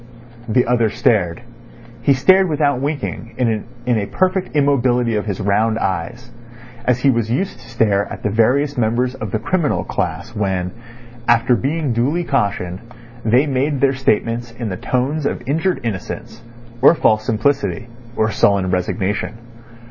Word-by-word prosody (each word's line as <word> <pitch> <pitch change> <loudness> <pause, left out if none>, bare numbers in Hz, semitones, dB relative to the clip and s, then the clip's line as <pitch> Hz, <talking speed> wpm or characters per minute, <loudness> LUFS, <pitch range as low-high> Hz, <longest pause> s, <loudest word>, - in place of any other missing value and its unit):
The 125 +3 +3
other 115 -2 +2
stared. 110 -3 +1 0.6
He 140 - +4
stared 185 +8 +4
without 145 -4 +1
winking 140 -5 -4
in 120 0 -1
a 100 - -3
perfect 185 -2 0
immobility 125 -5 +2
of 105 0 -2
his 100 -3 -3
round 105 +2 +1
eyes, 105 +5 -3 0.5
as 125 0 +1
he 140 - +4
was 115 -3 -1
used 185 +12 -2
to - - -15
stare 105 -4 +1
at - - -8
the 105 - 0
various 130 +6 +2
members 120 +3 +1
of 120 -5 -6
the 110 - -1
criminal 155 +7 0
class - - -4
when, 95 -3 -1 0.6
after 120 +1 +4
being 140 +2 -1
duly 140 +9 0
cautioned, 100 - -1 0.4
they 120 +6 +3
made 140 0 0
their 140 0 +3
statements 120 -2 0
in 115 -2 -4
the 90 - -3
tones 140 - -1
of - - -4
injured 165 +6 0
innocence, 115 +1 -5 0.4
or 140 - +7
false 110 -8 +2
simplicity, 130 +3 0 0.3
or 110 0 +1
sullen 100 -4 +2
resignation. 95 +4 -1
120 Hz, 150 wpm, -19 LUFS, 110-140 Hz, 0.6 s, or